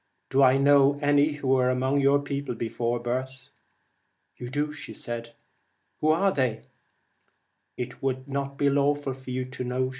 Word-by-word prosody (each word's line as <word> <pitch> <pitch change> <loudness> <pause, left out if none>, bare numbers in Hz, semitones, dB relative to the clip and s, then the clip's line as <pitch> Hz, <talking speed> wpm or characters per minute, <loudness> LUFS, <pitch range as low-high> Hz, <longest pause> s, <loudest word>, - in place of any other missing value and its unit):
'Do 135 +1 +3
I 130 0 +6
know 140 0 +5
any 145 +1 +3
who 145 -3 -4
were 130 -1 +3
among 130 +2 +1
your 140 +1 +4
people 140 -3 -4
before 115 +1 -2
birth? 130 +2 -4 0.4
' - - -48
'You 120 - -7
do.' 145 +3 -2 1.3
'Who 155 - +1
are 170 +5 +3
they?' 125 -8 -1 0.6
' - - -45 0.3
It 125 0 -6
would 130 0 -2
not 140 0 -4
be 145 - +2
lawful 145 0 +1
for 130 0 -12
you 130 0 -2
to 130 0 -6
know.' 130 +1 -1
135 Hz, 160 wpm, -26 LUFS, 125-145 Hz, 1.3 s, I